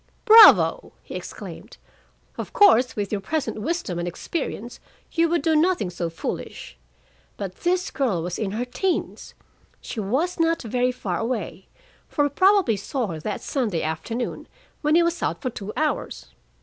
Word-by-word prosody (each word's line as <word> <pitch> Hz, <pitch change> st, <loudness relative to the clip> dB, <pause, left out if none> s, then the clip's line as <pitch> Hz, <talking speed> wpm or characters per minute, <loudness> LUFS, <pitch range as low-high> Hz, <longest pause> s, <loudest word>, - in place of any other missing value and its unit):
"Bravo!" 450 Hz, -1 st, +7 dB
he -, -, -10 dB
exclaimed. -, -, -8 dB, 0.6 s
"Of -, -, -7 dB
course, 260 Hz, -, +5 dB
with 205 Hz, -2 st, -3 dB
your 205 Hz, -2 st, -2 dB
present 300 Hz, -3 st, -3 dB
wisdom 295 Hz, -, -2 dB
and 175 Hz, -, -3 dB
experience, 240 Hz, -, -5 dB, 0.3 s
you 335 Hz, -1 st, +2 dB
would 340 Hz, -3 st, 0 dB
do 320 Hz, 0 st, +2 dB
nothing 310 Hz, -, +2 dB
so 175 Hz, -1 st, -3 dB
foolish. 165 Hz, -, -6 dB, 0.6 s
But 195 Hz, -2 st, -6 dB
this 365 Hz, +2 st, 0 dB
girl 225 Hz, -, -1 dB
was 175 Hz, +1 st, -4 dB
in 215 Hz, -, -1 dB
her 225 Hz, +5 st, -3 dB
teens; 365 Hz, +9 st, -3 dB, 0.4 s
she 230 Hz, -, -7 dB
was 275 Hz, -, -1 dB
not 330 Hz, -1 st, +1 dB
very 245 Hz, +2 st, 0 dB
far 190 Hz, -8 st, -4 dB
away, 225 Hz, -5 st, -4 dB, 0.4 s
for 290 Hz, -, +1 dB
he 290 Hz, -, +2 dB
probably 375 Hz, -, +3 dB
saw 245 Hz, +5 st, -3 dB
her 160 Hz, -2 st, -5 dB
that 205 Hz, +6 st, -4 dB
Sunday 220 Hz, -, -2 dB
afternoon, 225 Hz, +10 st, -4 dB, 0.3 s
when 300 Hz, +1 st, +2 dB
he 340 Hz, -, +5 dB
was 340 Hz, 0 st, -1 dB
out -, -, -1 dB
for 255 Hz, -, -3 dB
two 205 Hz, -1 st, -7 dB
hours. 310 Hz, 0 st, -2 dB
250 Hz, 160 wpm, -24 LUFS, 200-330 Hz, 0.6 s, Bravo